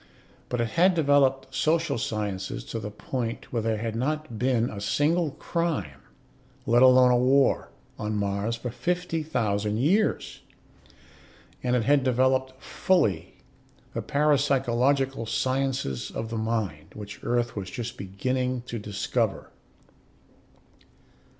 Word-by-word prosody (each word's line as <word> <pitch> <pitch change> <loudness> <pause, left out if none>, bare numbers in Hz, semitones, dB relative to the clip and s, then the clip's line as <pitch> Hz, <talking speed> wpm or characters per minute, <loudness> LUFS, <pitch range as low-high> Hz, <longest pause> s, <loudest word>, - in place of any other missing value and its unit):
But 125 - -2
it 115 -1 0
had 180 +7 +3
developed 135 -3 +2
social 155 -3 +1
sciences 105 -4 -3
to 115 - -5
the 105 -1 -5
point 115 +3 -5
where 115 - 0
there 110 0 0
had 110 0 -3
not 140 -1 -2
been 125 -2 +2
a 100 -4 -6
single 150 - +1
crime, 145 - -3 0.6
let 120 +2 +4
alone 130 -1 +7
a 125 - +4
war, 135 +2 +3 0.3
on 105 0 -2
Mars 100 +2 -1
for 120 +1 -5
fifty 175 +2 -2
thousand 105 -8 -1
years. 185 - +1 1.2
And 125 0 +1
it 120 - +1
had 140 +2 +3
developed 130 +1 +1
fully 105 - +1 0.6
the - - -2
parapsychological 135 -3 +1
sciences 130 - -1
of 115 0 -5
the - - -3
mind, 110 -9 -3
which 105 -1 -8
Earth 120 0 0
was 95 -3 -5
just 120 +2 -5
beginning 125 +6 -2
to 120 -2 -5
discover. 105 -1 -2
125 Hz, 125 wpm, -26 LUFS, 110-140 Hz, 1.2 s, alone